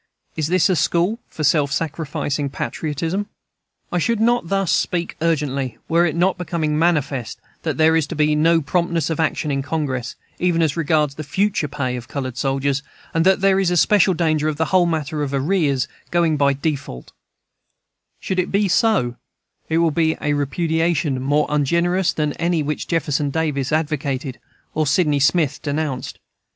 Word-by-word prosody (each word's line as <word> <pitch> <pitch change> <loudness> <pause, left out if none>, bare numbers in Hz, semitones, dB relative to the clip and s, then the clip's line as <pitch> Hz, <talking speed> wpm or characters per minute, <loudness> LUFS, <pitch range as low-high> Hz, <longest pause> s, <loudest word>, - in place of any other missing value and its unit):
Is 155 -2 -1
this 175 0 +3
a 185 - +2
school 175 +8 +1
for 155 - -6
self 145 -1 +3
sacrificing 145 -1 -2
patriotism? 165 +7 -3 0.6
I 180 - +1
should 230 +6 0
not 240 -2 +2 0.2
speak 170 +1 0
thus 165 - +1
urgently 135 -6 -2
were 170 +1 +3
it 160 - -3
not 180 +2 +1
becoming 155 -3 -1
manifest 145 -7 0 0.2
that - - -2
there 160 0 +4
is 160 -3 +1
to - - -6
be 150 0 +2
no 165 +2 +3
promptness 170 0 0
of 160 - -3
action 155 -1 0
in 140 0 0
Congress, 135 -4 -3 0.2
even 175 -2 +2
as 155 -3 0
regards 155 -3 +1
the 155 - -7
future 190 +2 0
pay 140 -4 -3
of 120 -1 -7
colored 130 -3 -4
soldiers, 135 +2 0 0.3
and 165 +2 +2
that 190 0 +4
there 195 0 +4
is 190 -2 +2
especial 180 +1 +4
danger 155 -2 +1
of 155 -2 -1
the 160 - +1
whole 180 -2 +5
matter 155 -2 -2
of 140 -1 -2
arrears 140 -3 +1 0.2
going 170 -2 +2
by 140 -1 +3
default 140 - -4 1.1
Should 185 - -2
it 180 - -1
be 200 +1 +2
so, 175 - +2 0.5
it 160 - +1
will 165 -1 +3
be 160 0 +1
a 145 - 0
repudiation 160 -1 0
more 145 +3 +2
ungenerous 170 +5 +1
than 150 -2 -1
any 170 -2 0
which 150 +1 -3
Jefferson 150 -3 0
Davis 145 -3 -1
advocated 145 -4 -2 0.3
or 155 -1 0
Sydney 150 -1 +2
Smith 140 +2 +2
denounced. 145 -3 -3
155 Hz, 170 wpm, -21 LUFS, 140-170 Hz, 1.1 s, whole